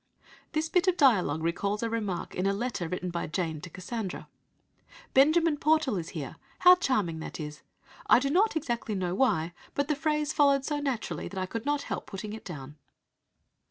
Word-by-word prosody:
'" - - -25
This 310 +1 0
bit 360 +2 +2
of 365 -1 +3
dialogue 185 - +3
recalls 200 +6 -1
a 230 - 0
remark 205 -6 -3
in 185 +2 0
a 195 - +2
letter 220 -5 -2
written 180 +1 -3
by 170 0 -3
Jane 160 -2 -2
to 180 - -8
Cassandra: 190 +3 -5 0.9
"Benjamin 310 +3 +4
Portal 305 -5 +2
is 165 -3 -4
here. 140 -3 -6 0.2
How 360 0 +8
charming 215 - 0
that 160 - -7
is! 150 -1 -6 0.5
I - - +7
do 275 +3 0
not 405 +6 +3
exactly 240 -8 -2
know 180 -2 -1
why, 175 -8 +1 0.2
but 285 +1 0
the 300 - +2
phrase 300 +1 0
followed 280 -2 +4
so 295 -1 -1
naturally 270 -6 -3
that 190 - -6
I 185 - -1
could 230 +7 -5
not 290 -1 +1
help - - -5
putting 205 +1 -6
it 220 - -8
down." 150 -4 -8
225 Hz, 195 wpm, -29 LUFS, 180-290 Hz, 0.9 s, How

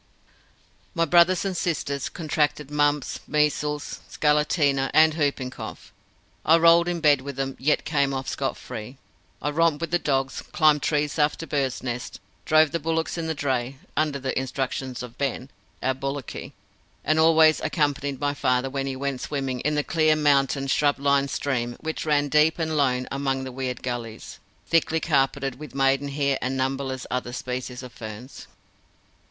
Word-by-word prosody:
My 165 -1 +2
brothers 175 +4 +4
and 190 -2 -2
sisters 145 -5 -2
contracted 150 -3 -1
mumps, 145 -1 +1
measles, 150 0 0
scarlatina, 150 -2 +2
and 155 0 +6
whooping 140 -4 -1
cough. - - -9 0.5
I 160 +2 +6
rolled 170 +1 +6
in 175 - 0
the 170 - -5
bed 145 -4 +4
with 140 0 -6
them 135 0 -3
yet 150 +3 +1
came 140 -3 +1
off 135 -1 -4
scot - - -2
free. 115 +5 -8 0.5
I 145 - 0
romped 165 -1 +2
with 170 +2 -1
dogs, 135 -2 0
climbed 155 -3 +4
trees 150 +1 0
after 150 +2 +1
birds' 135 -5 -1
nests, 125 -1 -4 0.3
drove 155 -1 +4
the 170 - -1
bullocks 165 +1 -1
in 165 -1 -3
the 160 - -2
dray, 130 -2 -2 0.2
under 155 -2 +1
the 130 -1 -3
instructions 130 -1 -3
of 120 -1 -11
Ben, 135 -1 -2 0.3
our 130 - +2
bullocky, 135 0 -5 0.5
and 155 +1 +2
always 160 -1 +6
accompanied 145 -3 -1
my 145 0 0
father 130 -1 0
when 135 0 -2
he 135 - -3
went 135 -1 -3
swimming 135 -3 -3
in 150 +3 0
the 150 - +1
clear, 155 -1 +2
mountain, 140 -2 +2
shrub 145 +1 +2
lined 140 0 +2
stream 120 -4 -2
which 160 0 -4
ran 145 -1 +2
deep 150 +2 +3
and 160 -2 -1
lone 125 -3 +1
among 135 -1 -1
the 130 - -6
weird 125 -1 -4
gullies, 120 -3 -6 0.3
thickly 165 -1 +2
carpeted 135 -3 0
with 150 -3 -10
maidenhair 140 +1 +1
and 130 +2 -2
numberless 130 0 -2
other 125 -1 -2
species 125 0 -5
of 125 -1 -10
ferns. 110 +4 -9
140 Hz, 165 wpm, -25 LUFS, 130-155 Hz, 0.5 s, and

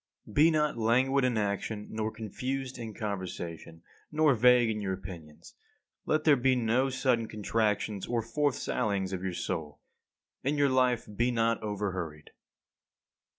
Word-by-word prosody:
51. 105 - -13
Be 155 +7 +6
not 150 -4 +1
languid 130 +4 +3
in 125 -3 +1
action, 105 +1 -2
nor 110 0 -2
confused 130 +4 -4
in 115 -2 -5
conversation, 90 -6 -5 0.3
nor 155 -2 +4
vague 125 0 +5
in 105 -1 -3
your 95 -2 -1
opinions. 85 -5 -10 0.5
Let 155 0 +2
there 150 -2 +6
be 130 0 +2
no 125 +3 +2
sudden 125 -3 +1
contractions 105 -1 -1
or 120 -1 0
forth 145 +4 0
sallyings 100 -6 -1
of 90 - -3
your 95 -2 -3
soul. 80 -4 -4 0.6
In 145 +3 0
your 145 -1 +4
life 125 -2 +2
be 120 +4 +2
not 115 -1 +1
over 105 -2 -2
hurried. 80 -5 -6
115 Hz, 150 wpm, -30 LUFS, 100-130 Hz, 0.6 s, Be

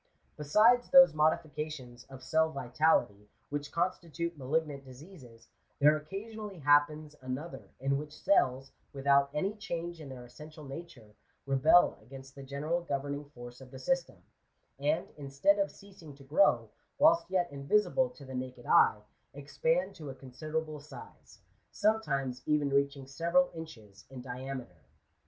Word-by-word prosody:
Besides 215 +12 +4
those 270 - +8
modifications 150 -5 -2
of 135 -1 -12
oell 160 +4 +1
vitality, 125 -7 +1 0.2
which 145 0 -4
constitute 170 -1 -2
malignant 145 0 -2
diseases, 130 -4 -14 0.3
there 150 +1 +5
occasionally 200 +6 -7
happens 150 +1 +2
another 130 +6 -6
in 135 +1 0
which 150 0 -8
cells, 135 -8 +2 0.2
without 140 0 +3
any 170 +8 -1
change 175 -5 -5
in 145 - -9
their 125 -2 -9
essential 150 +5 -12
nature, 135 -7 -10 0.3
rebel 140 +6 +4
against 135 +3 -12
the 140 - -11
general 145 +5 -2
governing 145 -2 -3
force 120 -3 -12
of 130 - -12
the 130 - -10
system; 170 - -1 0.6
and, 150 +3 0
instead 140 +8 +1
of 195 - +1
ceas 200 -1 -16
ing 150 -4 -11
to 140 - -16
grow, 135 - +3 0.3
whilst 320 - +4
yet 180 -3 0
invisible 205 - +1
to 150 - -14
the 130 - -9
naked 125 -1 -6
eye, 105 -1 +4 0.3
expand - - -1
to 150 -4 -8
a 135 - -7
considerable 155 +4 -5
size, 145 +1 -14 0.3
sometimes 140 - 0
even 150 -2 +1
reaching 140 0 0
several 170 - +1
inches 110 -12 -11
in 130 -1 -9
diameter. 125 -7 -7
145 Hz, 140 wpm, -31 LUFS, 130-170 Hz, 0.6 s, those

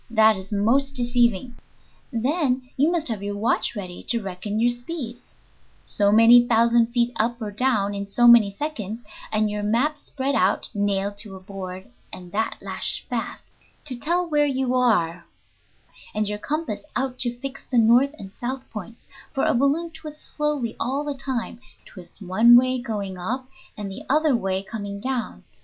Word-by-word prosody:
That 220 -1 +5
is 190 +1 -8
most 260 +7 +1
deceiving. 240 -2 +1 0.5
Then 255 +1 0
you 290 +4 +3
must 340 -3 0
have 220 -4 -3
your 205 0 -4
watch 225 +2 0
ready 185 -4 -6
to 235 - +2
reckon 200 +1 -4
your 240 +1 +4
speed, 245 -1 -6 0.6
so 205 -1 +2
many 230 +3 +8
thousand 235 0 +4
feet 240 0 +1
up 235 +2 0
or 215 -3 -4
down 210 -3 +1
in 200 0 -4
so 240 +4 +3
many 235 -4 +8
seconds, 225 -2 -5 0.3
and 215 0 +2
your 210 0 -3
map 245 +9 +1
spread 275 -1 -3
out 190 -6 +1
(nailed 200 -1 -1
to 205 -2 -8
a - - -9
board, 185 -1 -8 0.2
and 180 -1 -10
that 220 +3 -1
lashed - - -3
fast), - - -5 0.3
to 265 -4 -2
tell 345 +8 0
where 295 -2 +2
you 265 -2 0
are, 180 -10 +1 0.9
and 215 0 0
your 210 0 -3
compass 300 -4 -3
out 260 -1 -2
to 240 -1 0
fix 275 +1 -7
the 250 - 0
north 240 +6 +5
and 195 -1 -10
south 255 +2 -5
points, 225 +1 -9 0.2
for 270 - 0
a - - +3
balloon 285 +7 +1
twists 305 -1 -9
slowly 295 -6 -1
all 270 +4 -1
the 295 -1 -3
time, 260 -4 -4 0.3
twists 180 -1 -13
one 220 +5 +5
way 255 +1 +4
going 200 -6 -4
up 255 +8 -3 0.3
and 205 -2 -5
the 190 - -7
other 300 -1 +3
way 190 -3 -1
coming 200 -1 -6
down. 250 -1 -3
235 Hz, 175 wpm, -24 LUFS, 205-265 Hz, 0.9 s, many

